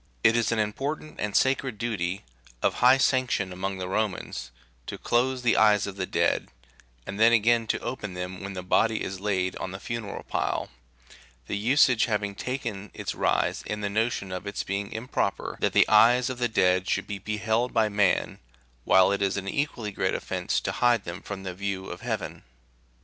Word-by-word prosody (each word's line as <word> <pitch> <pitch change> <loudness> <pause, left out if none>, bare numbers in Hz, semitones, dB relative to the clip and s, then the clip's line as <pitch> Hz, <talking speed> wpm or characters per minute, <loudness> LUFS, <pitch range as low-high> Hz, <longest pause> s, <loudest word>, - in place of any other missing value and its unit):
It 110 +1 +5
is 115 -1 +1
an 115 - 0
important 135 +9 -3
and 105 -1 0
sacred 130 -3 +1
duty, 100 -5 -2 0.4
of - - +3
high 125 +2 +7
sanction 130 -8 +1
among 95 +1 -3
the 90 -1 -4
Romans, 95 - -2 0.4
to - - -5
close99 125 +2 +1
the 120 - +3
eyes 105 -2 +5
of 100 - -6
the - - -3
dead, - - +1 0.6
and 100 - -6
then 115 +1 +6
again 115 0 +3
to - - 0
open 105 -7 -5
them 90 +1 -5
when 100 +1 -6
the 90 -1 -6
body 110 +4 +2
is 95 0 -5
laid 95 -2 -1
on - - -4
the 95 +1 -7
funeral 115 -1 -5
pile, - - -2 0.7
the 100 - -3
usage 120 +2 +4
having 105 -2 -1
taken 110 -3 -4
its - - -4
rise - - 0
in 105 0 -3
the 100 -1 -2
notion 110 -3 -1
of 95 +2 -5
its 100 - -3
being 100 +1 -3
improper 115 +3 -2
that - - 0
the - - +5
eyes 120 +4 +5
of 125 - -7
the 120 - +2
dead 95 -3 +2
should 100 - 0
be 100 -1 -5
beheld 110 +4 -1
by 110 -2 +3
man, 100 -3 +1 0.5
while 95 0 +5
it 100 - -1
is 100 0 +1
an 100 -1 -4
equally 120 -2 -2
great 95 -1 -1
offence - - -1
to - - -3
hide 120 -3 +2
them 85 +2 -7
from 100 -1 -7
the 90 -1 -4
view 95 0 -3
of 90 - -8
heaven. - - -4
105 Hz, 195 wpm, -26 LUFS, 95-120 Hz, 0.7 s, high